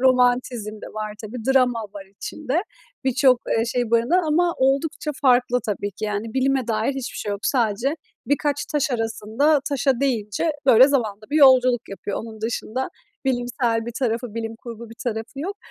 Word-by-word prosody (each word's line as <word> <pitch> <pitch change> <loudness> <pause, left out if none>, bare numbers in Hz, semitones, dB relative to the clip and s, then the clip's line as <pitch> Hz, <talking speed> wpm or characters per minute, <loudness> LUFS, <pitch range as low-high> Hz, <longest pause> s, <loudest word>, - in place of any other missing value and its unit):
romantizm 250 -4 +2
de - - -8
var, 215 -1 -4
tabii, 225 +1 -7
drama 250 -3 +3
var 195 -2 -9
içinde. 305 +4 -2 0.4
Birçok, 260 -1 +4 0.2
eee, 225 - +2
şey 240 -1 -1
barındıran 240 +11 +3
ama 340 +3 +2
oldukça 275 +3 +1
farklı, 250 -1 +4
tabii 205 -1 -2
ki, 205 +2 -6
yani, 210 +2 -3
bilime 265 -1 +1
dair 220 +2 +1
hiçbir 265 -2 -5
şey 205 - -3
yok. 200 - -3
Sadece 245 +4 +1 0.3
birkaç 290 +2 0
taş 295 -1 +1
arasında, 230 +5 +1
taşa 270 -2 +1
deyince, 240 +1 0 0.2
böyle, 255 +1 +8
zamanda 215 -7 -1
bir 305 - +1
yolculuk 255 -4 +5
yapıyor. 195 0 -4
Onun 220 -1 -8
dışında 230 +3 -2 0.4
bilimsel 245 -2 0
bir 235 - -4
tarafı, 235 -3 -1
bilim 225 0 -4
kurgu 235 -1 -9
bir 230 - -10
tarafı 225 +3 -4
yok. 390 +6 -4
245 Hz, 165 wpm, -23 LUFS, 225-270 Hz, 0.4 s, böyle